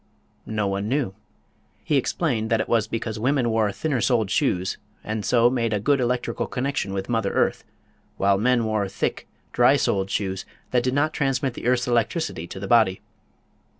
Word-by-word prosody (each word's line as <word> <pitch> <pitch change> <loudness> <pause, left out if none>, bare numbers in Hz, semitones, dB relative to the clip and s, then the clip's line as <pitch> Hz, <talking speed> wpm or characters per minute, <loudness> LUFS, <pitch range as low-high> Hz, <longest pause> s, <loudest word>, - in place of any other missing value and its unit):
No 105 -1 -1
one 100 +1 -2
knew. 130 -7 0 0.7
He 150 - 0
explained 125 -4 0
that 115 - +2
it - - -1
was 115 -3 +2
because 110 -1 -4
women 125 0 +1
wore 110 -2 +2
thinner 140 +1 -1
soled 110 -5 +1
shoes, 95 -11 0 0.2
and 110 0 -3
so 115 +4 +4
made 120 -3 0
a 105 - +1
good 140 +6 +2
electrical 120 -1 -1
connection 130 -6 -2
with 95 0 -3
mother 115 -4 0
earth, - - +1 0.5
while 100 0 +3
men 120 +1 +2
wore 105 -3 0
thick, 100 - -3 0.2
dry - - +5
soled 95 -1 0
shoes 95 -2 -2 0.3
that 125 - +3
did 130 +2 -1
not 155 +2 +1
transmit 135 -2 0
the 120 - -5
earth's 125 0 +2
electricity 120 - -1
to 95 - -8
the 100 - -5
body. 110 -4 +4
115 Hz, 180 wpm, -24 LUFS, 100-125 Hz, 0.7 s, dry